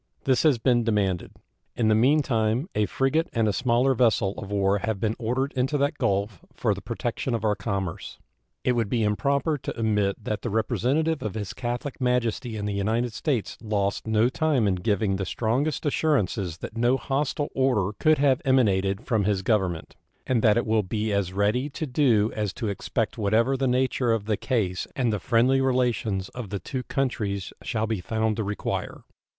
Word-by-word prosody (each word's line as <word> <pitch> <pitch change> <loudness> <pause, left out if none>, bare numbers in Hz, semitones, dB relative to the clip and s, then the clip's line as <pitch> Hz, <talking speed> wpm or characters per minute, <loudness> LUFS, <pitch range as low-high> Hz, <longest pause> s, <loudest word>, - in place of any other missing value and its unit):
This 130 -2 +2
has 150 -6 +4
been 120 0 +2
demanded. 100 -5 0 0.4
In 115 - +1
the 110 - +4
mean 135 +8 +4
time 115 +3 0
a 105 -1 +1
frigate 155 +5 0
and 115 -2 +2
a 105 - +1
smaller 125 +3 +2
vessel 110 -5 +2
of 100 - -7
war 100 0 +1
have 110 0 -2
been 110 +1 0
ordered 130 +4 -1
into 130 +3 0
that 145 +2 0
Gulf 100 -1 0 0.2
for - - +1
the - - -7
protection 125 - -3
of 115 - -3
our 105 - +3
commerce. 95 -4 -4 0.5
It - - +2
would 115 -4 0
be 115 -1 +1
improper 140 +8 +1
to 120 - -6
omit 105 -3 0
that 105 -1 -3
the 120 - -3
representative 135 +9 0
of 110 -1 -4
His 105 -3 -4
Catholic 120 +3 -4
Majesty 125 -2 0
in 105 - -3
the 105 - -2
United 110 +4 0
States 130 -6 -2
lost 105 -2 -1
no 110 +1 +3
time 135 -3 +1
in 100 - +2
giving 100 0 +1
the 95 - -2
strongest 130 - -1
assurances 105 - 0
that 110 - -8
no 120 +3 +2
hostile 140 +3 -1
order 115 -7 +1
could 155 0 +4
have 135 -2 +3
emanated 100 -5 +2
from 110 -6 +1
his 100 -2 0
Government, 95 -7 0 0.3
and 125 -3 +1
that 110 0 +4
it 120 - +1
will 110 -1 +2
be 105 +2 -2
as 100 -3 0
ready 105 +8 +1
to 150 +3 -4
do 125 -6 +2
as 105 -3 -2
to 115 -4 -3
expect 100 - -2
whatever 110 +6 +2
the 135 0 0
nature 125 -1 +1
of 110 -3 -2
the 110 0 +1
case 100 -7 -1
and 120 -4 +1
the 105 - -1
friendly 125 +5 +3
relations 120 -7 0
of 125 -5 -7
the 100 - -3
two 130 +6 -4
countries 105 -8 -2
shall 110 -2 -1
be 110 -4 -2
found 110 +3 -1
to 110 - -1
require. 105 +1 -4
115 Hz, 190 wpm, -25 LUFS, 105-130 Hz, 0.5 s, has